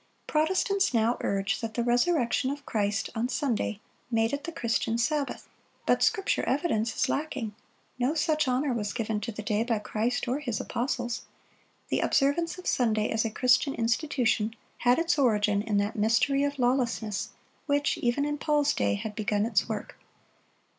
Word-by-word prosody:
Protestants 370 +1 +1
now 230 +2 +3
urge 200 +3 0
that 225 -1 -4
the 235 - 0
resurrection 245 +1 +2
of 285 0 -5
Christ 210 0 -1
on 235 +2 -1
Sunday 230 -7 -1 0.3
made 225 +1 +1
it 285 +1 -3
the 335 - -4
Christian 230 -5 -1
Sabbath. 285 +4 -1 0.4
But - - +3
Scripture 390 -3 +2
evidence 245 -6 0
is - - +1
lacking. 270 -7 -2 0.5
No 255 +6 +1
such 310 -1 +1
honor 255 +2 +1
was 210 -3 -2
given 220 -3 -2
to 230 +2 -3
the 215 0 -7
day 210 +1 +1
by 230 -2 0
Christ 220 +4 -1
or 255 +4 0
His 245 -7 -3
apostles. 240 -1 -2 0.6
The - - +1
observance 310 +5 +1
of 365 - -10
Sunday 220 -4 +1
as 220 0 +1
a - - 0
Christian 255 +5 +2
institution 230 -2 0 0.2
had 245 0 +4
its 330 -1 +1
origin 210 -5 +3
in 210 -1 -1
that 205 +1 0
"mystery 230 +6 +2
of 285 0 -1
lawlessness"(79) 245 -5 0 0.3
which, 285 0 +1
even 245 +4 +1
in 295 0 -2
Paul's 295 -1 +2
day, - - +1
had 210 +1 -5
begun 210 0 0
its 225 -2 +1
work. 215 -2 -5
240 Hz, 165 wpm, -28 LUFS, 220-285 Hz, 0.6 s, had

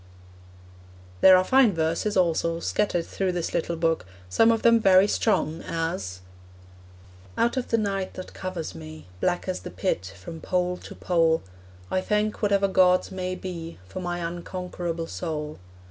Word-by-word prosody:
There 185 -1 +9
are 185 - +3
fine 250 -2 +4
verses, 165 +6 0
also, 165 -1 +1
scattered 175 -2 0
through 190 -2 -2
this 175 -2 -3
little 170 0 -1
book; 165 - 0 0.2
some 225 - +5
of 225 -1 0
them 230 -1 +6
very 190 -2 +6
strong, 165 -8 +1
as 100 - -3 1.2
Out 235 +2 +2
of 255 -2 -2
the 230 - +2
night 195 -3 -2
that 185 - -8
covers 180 - -5
me, 80 -1 -10
Black 175 - 0
as 185 - -2
the - - -8
pit 95 - -2
from 160 - -9
pole 180 0 0
to - - -11
pole, 165 -2 +2 0.5
I 185 - +1
thank 210 +1 0
whatever 200 -2 +3
gods 185 -1 +3
may 185 -1 -3
be 170 -3 -7
For 140 - -6
my 175 -1 -3
unconquerable 175 -1 -4
soul. 155 -3 -5
180 Hz, 155 wpm, -26 LUFS, 165-195 Hz, 1.2 s, There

